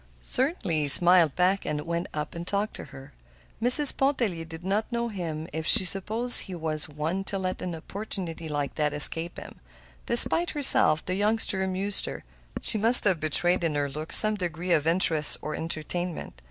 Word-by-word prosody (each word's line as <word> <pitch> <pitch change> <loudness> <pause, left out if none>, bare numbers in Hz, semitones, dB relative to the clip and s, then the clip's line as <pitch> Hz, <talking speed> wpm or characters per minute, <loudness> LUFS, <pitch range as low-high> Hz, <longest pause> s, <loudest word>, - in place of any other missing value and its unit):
Certainly 255 - -3
he 145 - -4
smiled 175 0 +2
back, 185 +2 -1
and 150 - -5
went 170 +3 -6
up 150 +3 -7
and 170 0 -10
talked 205 +3 -4
to - - -11
her. 135 -2 -16 0.5
Mrs. 255 +4 +10
Pontellier 235 -11 -3
did 165 +1 -13
not 205 +5 -4
know 235 0 -4
him 165 -6 -8
if 160 0 -6
she 215 -5 +6
supposed 220 +6 +2
he 185 - -8
was 155 -2 -6
one 155 +6 -5
to 195 - -5
let 185 -1 -6
an 180 -2 -6
opportunity 170 -2 -8
like 145 -2 -5
that 150 -1 -4
escape 165 +3 -2
him. - - -13 0.5
Despite 330 +8 +6
herself, 265 - +1
the 185 - -5
youngster 205 0 -2
amused 190 +1 +3
her. - - -9 0.4
She 215 - +2
must 230 +4 +3
have 190 -5 0
betrayed 175 +4 0
in 160 -3 -3
her 145 -1 -4
look 155 +3 -9
some 215 0 +6
degree 175 -3 -6
of 155 -2 0
interest 165 -3 +2
or 155 - -8
entertainment. 165 - -6
175 Hz, 180 wpm, -24 LUFS, 155-205 Hz, 0.5 s, Mrs